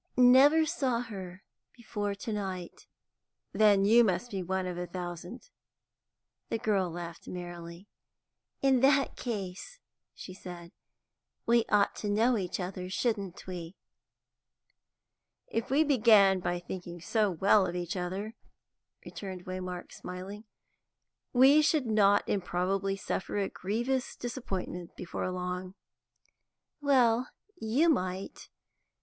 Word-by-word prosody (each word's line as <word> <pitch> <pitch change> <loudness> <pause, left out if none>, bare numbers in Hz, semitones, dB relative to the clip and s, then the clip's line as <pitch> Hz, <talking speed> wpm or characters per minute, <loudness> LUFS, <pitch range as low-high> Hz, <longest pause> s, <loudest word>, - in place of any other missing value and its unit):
"Never 270 +6 +7
saw 255 -6 0
her 190 -5 -8 0.3
before 205 -3 -3
to 215 +2 -5
night." 190 -4 -5 0.7
"Then 205 -2 +5
you 230 +3 +7
must 195 +3 0
be 195 -2 -2
one 190 +1 -2
out 180 - -2
of 175 - -7
a 180 - -4
thousand." 175 - -7 1.0
The - - 0
girl 200 -5 +1
laughed 170 0 -8
merrily. 175 +1 -8 0.8
"In 265 -2 +4
that 275 +2 +3
case," 205 - -5 0.4
she 185 - -9
said, 175 -2 -10 0.7
"we 235 0 +3
ought 205 -1 +3
to 210 - -3
know 225 +4 +3
each 185 -4 -2
other, 180 0 -5
shouldn't 200 -3 -2
we?" 180 -1 -7 1.7
"If 230 - -3
we 285 +4 +4
began 215 -9 +5
by 175 0 -1
thinking 175 0 -7
so 210 +4 +1
well 190 +2 +3
of 175 - -4
each 175 0 -3
other," 190 +4 -4 0.7
returned 185 -3 -7
Waymark, 185 -1 -5
smiling, 190 +4 -8 0.9
"we 270 +4 +6
should 305 -2 +2
not 205 -2 +3
improbably 195 +1 -1
suffer 195 0 -3
a 200 -1 0
grievous 240 +7 -2
disappointment 190 -8 -5
before 180 - -4
long." 180 +1 -4 1.1
"Well, 250 -4 +3 0.3
you 275 +2 +1
might. 185 - -1
195 Hz, 120 wpm, -30 LUFS, 180-235 Hz, 1.7 s, Never